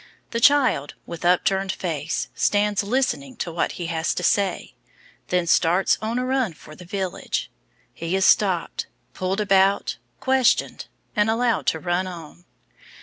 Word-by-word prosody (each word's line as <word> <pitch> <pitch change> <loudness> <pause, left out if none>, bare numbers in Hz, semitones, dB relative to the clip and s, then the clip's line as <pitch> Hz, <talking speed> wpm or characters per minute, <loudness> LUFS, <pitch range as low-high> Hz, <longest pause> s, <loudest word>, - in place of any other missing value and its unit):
The 230 - -1
child, 255 - +3
with 170 0 -8
upturned 190 +2 +2
face, 165 -4 -3
stands 205 0 +1
listening 260 +4 -1
to 175 - -4
what 165 - -1
he 175 - -5
has 165 -1 -1
to 180 - -3
say, 195 - 0 0.5
then 180 -1 +1
starts 175 +2 +3
on 225 +2 -2
a 250 - -1
run 255 -7 0
for 155 0 -14
the 180 - -12
village. 190 0 -3 0.4
He 165 +2 -3
is 190 0 +2
stopped, 185 -5 +2 0.3
pulled 185 +2 -2
about, 195 -1 +2 0.2
questioned, 265 -2 +1 0.3
and 210 +1 +2
allowed 230 -1 +1
to 160 - +2
run 175 +2 -1
on. 175 -1 -10
190 Hz, 145 wpm, -23 LUFS, 175-220 Hz, 0.5 s, child